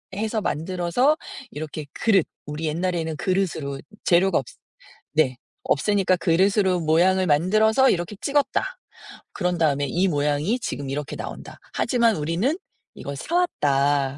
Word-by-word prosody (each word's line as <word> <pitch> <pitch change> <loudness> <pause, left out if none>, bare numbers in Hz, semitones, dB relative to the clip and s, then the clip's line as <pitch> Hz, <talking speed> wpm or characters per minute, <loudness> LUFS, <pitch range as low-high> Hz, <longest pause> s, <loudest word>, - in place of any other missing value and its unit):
해서 220 +1 -1
만들어서 185 - +1 0.3
이렇게 155 0 -6
그릇, 195 -7 +2 0.2
우리 150 +2 -5
옛날에는 165 0 -1
그릇으로 165 -8 -1 0.2
재료가 180 0 +3
없" 130 - -1 0.7
네. 135 -5 +2 0.3
"없으니까 190 +5 +2
그릇으로 185 +2 +2
모양을 180 +4 +3
만들어서 215 - +4
이렇게 175 +3 -2
찍었다. 295 - 0 0.5
그런 180 -2 -1
다음에 145 -3 +2
이 180 +8 +1
모양이 150 - 0
지금 140 - -4
이렇게 145 +1 -4
나온다. - - -8 0.2
하지만 235 -4 +2
우리는 170 - 0 0.4
이걸 140 0 -7
사 335 - -4
왔다." 140 - +1
175 Hz, 320 characters per minute, -23 LUFS, 150-205 Hz, 0.7 s, 만들어서